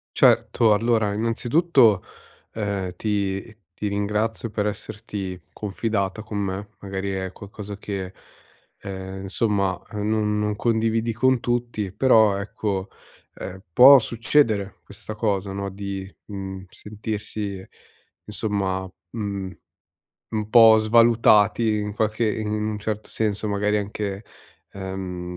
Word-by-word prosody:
Certo. 110 -2 +4
Allora, 110 -1 +1
innanzitutto, 115 - +3 0.5
ehm, 100 -4 -3
ti 100 +1 -2 0.2
ti 105 - -3
ringrazio 105 +3 -1
per 105 -1 -1
esserti 105 -3 -5
confidata 105 -1 -2
con 110 -1 -6
me, 100 0 -3
magari 95 0 -4
è 95 -1 -3
qualcosa 100 +1 -9
che, 95 -3 -5 0.6
ehm, 95 0 -7
insomma, 100 -1 0 0.2
uhm, 105 0 -2
non 105 -1 +1
non 105 0 0
condividi 115 +1 +1
con 130 +2 +3
tutti, 120 -5 -2
però 110 -3 +4
ecco, 100 -1 -3 0.4
ehm, 95 +1 -8
può 135 +6 +10
succedere 115 -5 +1
questa 100 +2 -9
cosa, 100 -3 -1
no, 100 0 -3
di, 100 0 -5 0.2
mhmm, 95 -2 -6
sentirsi 105 -2 -5 0.6
insomma, 95 -2 -2 0.3
mhmm, 100 -3 -3 0.8
un 110 -2 -2
po' 110 -2 +8
svalutati 110 -1 +4
in 105 -1 -3
qualche 110 +1 0
i 110 0 0
in 105 -1 -2
un 105 -1 -2
certo 105 0 -4
senso, 105 -1 -1
magari 105 +1 +1
anche, 100 0 -4 0.5
ehm, 95 -2 -5
105 Hz, 120 wpm, -24 LUFS, 100-110 Hz, 0.8 s, può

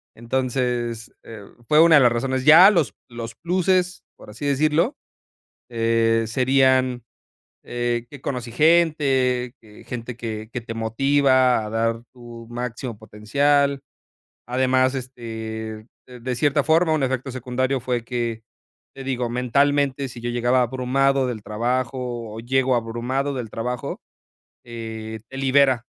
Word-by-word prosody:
Entonces, 120 -1 -2
eh, 110 -3 -10 0.2
fue 155 +1 +5
una 165 -1 +7
de 145 - +7
las 120 -2 +5
razones. 130 +2 -1
Ya 165 +6 +9
los 155 - 0
los 115 -1 -7
pluses, 180 +3 0
por - - -15
así 105 +7 -7
decirlo, 155 - +1 0.7
eh, 115 -1 +1
serían, 130 0 +2 0.6
eh, 120 -1 -2
que 145 - -11
conocí 125 -4 -4
gente, 135 -5 +2
que 105 -2 -16
gente 120 -1 -6
que 110 -2 -6
que 125 - -3
te 115 - -7
motiva 130 +1 +2
a - - -6
dar 115 +1 -1
tu 120 -2 -11
máximo 120 0 -5
potencial. 140 +7 +1 0.7
Además, 130 +1 +2
este, 110 -4 -6 0.2
de 125 -1 -12
de 125 +1 -3
cierta 145 +2 +2
forma, 160 +1 +3
un 155 - 0
efecto 130 0 -2
secundario 130 +1 -2
fue 125 -1 -2
que, 115 -2 -3 0.5
te 135 - -8
digo, 125 -2 -2
mentalmente, 140 +2 +1
si 120 -1 -10
yo 120 - -2
llegaba 120 +1 +2
abrumado 130 +2 +1
del 120 -4 -5
trabajo, 120 +1 -3
o 110 - -6
llego 130 +2 +1
abrumado 120 +5 -2
del 120 -4 -5
trabajo, 125 +3 -4 0.7
eh, 110 -1 -7
te 135 - -8
libera, 135 -2 +3
125 Hz, 135 wpm, -22 LUFS, 115-135 Hz, 0.7 s, Ya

